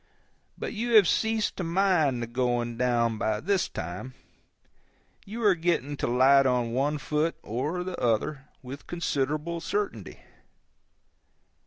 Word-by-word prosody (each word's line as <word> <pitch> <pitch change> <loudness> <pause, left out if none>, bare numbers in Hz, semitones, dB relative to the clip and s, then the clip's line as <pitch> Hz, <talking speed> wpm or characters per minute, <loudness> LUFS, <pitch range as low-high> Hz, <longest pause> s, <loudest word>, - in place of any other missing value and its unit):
But - - -5
you 235 +1 0
have 205 -5 +8
ceased 220 +2 0
to 190 - -2
mind 165 -8 +2
the - - -2
going 120 0 -1
down 115 -2 +1
by 110 -1 0
this 190 - 0
time; 90 +10 -6 1.1
you 225 +3 -5
are 205 -2 +6
getting 165 -4 -1
to - - -1
light 135 +3 +5
on 125 -2 +1
one 145 +4 0
foot 150 +3 -1
or 150 +11 -2
the 185 0 -6
other 125 +5 0 0.2
with 135 +3 -9
considerable 160 0 -2
certainty. 155 - -3
145 Hz, 135 wpm, -27 LUFS, 120-175 Hz, 1.1 s, have